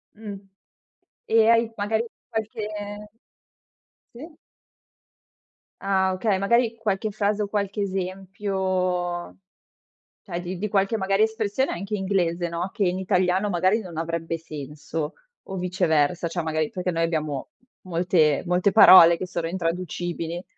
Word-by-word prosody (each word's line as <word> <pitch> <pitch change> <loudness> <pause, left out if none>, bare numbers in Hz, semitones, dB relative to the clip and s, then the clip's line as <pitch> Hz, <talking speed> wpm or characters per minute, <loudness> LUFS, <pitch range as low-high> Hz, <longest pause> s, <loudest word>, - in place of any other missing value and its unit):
Mh. 210 -2 -7 1.0
E 225 -1 +6
hai 230 0 +5
magari 220 +2 0 0.2
qualche 220 0 -4 1.5
Sì. 305 +6 -11 1.5
Ah, 190 -1 +2
okay. 190 +1 0
Magari 230 +3 +2
qualche 215 -1 -2
frase 210 0 0
o - - -3
qualche 200 0 -2
esempio 185 -2 -2 0.9
cioè 175 -3 -5
di 180 +1 -5
di 210 +4 -2
qualche 200 +2 +1
magari 195 0 +1
espressione 220 +3 0
anche 195 +4 -4
inglese, 180 -3 0
no, 170 +3 -3
che 210 - 0
in 180 +1 -1
italiano 185 +2 +1
magari 185 +4 +2
non 180 -6 -9
avrebbe 165 0 -2
senso, 150 0 -6 0.3
o 190 - -7
viceversa, 175 -3 +1
cioè 170 +1 -3
magari 155 -1 -1
perché 180 0 -2
noi 165 -1 0
abbiamo 155 -4 -2 0.3
molte 170 -4 +2
molte 180 +3 +2
parole 170 -5 +9
che 175 - -5
sono 170 -2 -3
intraducibili. 175 -1 -3
185 Hz, 125 wpm, -24 LUFS, 170-205 Hz, 1.5 s, parole